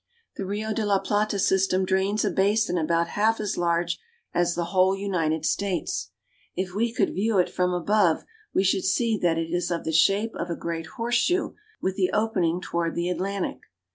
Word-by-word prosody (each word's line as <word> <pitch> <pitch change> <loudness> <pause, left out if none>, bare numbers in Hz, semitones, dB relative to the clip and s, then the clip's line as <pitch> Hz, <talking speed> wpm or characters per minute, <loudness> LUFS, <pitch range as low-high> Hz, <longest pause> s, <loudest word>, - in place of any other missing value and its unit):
The 195 - -4
Rio 215 +2 -2
de 220 - -1
la 205 -1 +3
Plata 205 +1 0
system 190 -1 +2
drains 190 +3 +1
a - - +1
basin 205 0 +2
about 170 0 +1
half 220 +2 +1
as 210 -2 -2
large 170 0 0 0.3
as 175 0 +1
the 170 0 -1
whole 190 +1 +4
United 165 -6 -1
States. 195 -2 -1 0.5
If 185 0 -3
we 230 +4 0
could 235 - 0
view 215 +2 +1
it 180 - +2
from 180 0 +1
above 180 -1 +2 0.3
we - - +2
should 195 0 +2
see 225 +4 +2
that 170 -2 +2
it 165 0 -2
is 175 0 0
of 170 -1 -2
the 160 - -2
shape 200 +7 +3
of 175 - -4
a 170 - -1
great 165 -1 -4
horseshoe, 240 +10 +1 0.3
with 190 0 -1
the 185 -2 +2
opening 185 -6 +1
toward 170 -1 -2
the 170 +1 -1
Atlantic. 190 +2 -2
190 Hz, 190 wpm, -25 LUFS, 170-205 Hz, 0.5 s, whole